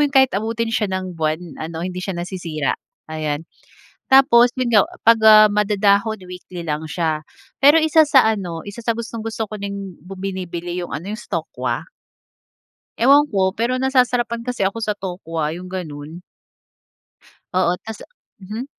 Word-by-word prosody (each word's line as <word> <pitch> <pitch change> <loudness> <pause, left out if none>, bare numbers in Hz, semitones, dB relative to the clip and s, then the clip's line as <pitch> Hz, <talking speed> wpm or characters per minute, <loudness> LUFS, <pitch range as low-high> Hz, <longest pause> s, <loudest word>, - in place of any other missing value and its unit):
'yon, - - -15
kahit 265 -1 +5
abutin 225 +3 -2
siya 215 -2 0
ng 185 -1 -3
buwan 155 +1 0 0.2
ano, 160 +1 -5
hindi 180 0 -4
siya 190 -1 -4
nasisira, 175 -5 -3 0.4
ayan. 155 0 -3 0.7
Tapos 260 -3 +7
'yon 255 -2 0
nga 210 -3 +7 0.2
'pag, 230 0 +7
ah, 215 0 +9
madadahon, 210 +1 +2
weekly 180 -1 -8
lang 150 0 -2
siya. 160 -1 -1 0.4
Pero 290 +4 +7
isa 315 0 +5
sa 270 -4 +6
ano, 180 -7 -3
isa 205 +3 -9
sa 230 - +2
gustong-gusto 225 -1 -4
ko 215 - -5
ding 200 -2 -6
bu 190 +2 -10
binibili 180 -2 -4
'yong 175 - -6
ano 180 +8 -5
yung 220 - -8
sa 175 -8 -3
tokwa. 125 -3 -4 1.2
Ewan 280 +5 +6
ko 190 -1 +1
pero 245 +3 0
nasasarapan 250 -3 +1
kasi 245 -6 0
ako 195 - -5
sa 215 - 0
tokwa 170 -5 -4
yung 180 +1 -9
ganun. 160 -2 -7 1.3
Oo, 180 -1 +3
tas 220 0 -7 0.4
mhm. 215 +6 -6
195 Hz, 155 wpm, -20 LUFS, 175-230 Hz, 1.3 s, ah